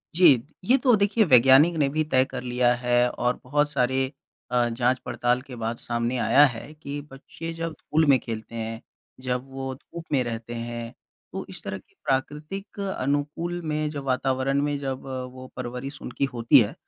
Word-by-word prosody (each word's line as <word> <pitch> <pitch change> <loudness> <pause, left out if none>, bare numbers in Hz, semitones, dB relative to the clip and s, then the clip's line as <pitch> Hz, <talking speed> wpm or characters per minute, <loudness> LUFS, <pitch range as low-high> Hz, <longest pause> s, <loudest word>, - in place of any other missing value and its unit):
जी। 180 +1 +7 0.4
ये 255 +6 +5
तो 250 -3 +6
देखिए 205 +2 +3
वैज्ञानिक 135 +4 +6
ने 145 -3 +3
भी 155 +3 0
तय 130 0 +5
कर 130 -1 -6
लिया 125 0 +2
है, 120 0 +2
और 125 0 -1
बहुत 145 +3 +1
सारे 130 0 +1 0.4
अ, 120 -1 +3
जाँच-पड़ताल 125 +1 0
के 130 -1 -10
बाद 115 0 -3
सामने 120 +1 -2
आया 145 +4 +6
है 120 +6 -9
कि 145 -2 -6
बच्चे 160 +4 -8
जब 165 0 -3
धूल 160 +1 +1
में 135 - +7
खेलते 115 0 -6
हैं, 115 0 -4 0.4
जब 125 -1 -1
वो 135 0 -4
धूप 165 +4 -10
में 135 -4 +3
रहते 115 0 -5
हैं, 120 0 -5 0.4
तो 190 0 -4
इस 180 -3 -6
तरह 100 0 -4
की 95 - -21
प्राकृतिक 150 +10 -3
अनुकूल 165 -1 -2
में, 155 -1 -1
जो 145 -2 -5
वातावरण 135 +1 +1
में 145 0 0
जब 135 -2 -3 0.3
वो 130 0 -9
परवरिश 125 +3 -6
उनकी 130 +3 -2
होती 115 -1 +6
है, - - +1
130 Hz, 180 wpm, -25 LUFS, 120-150 Hz, 0.4 s, जी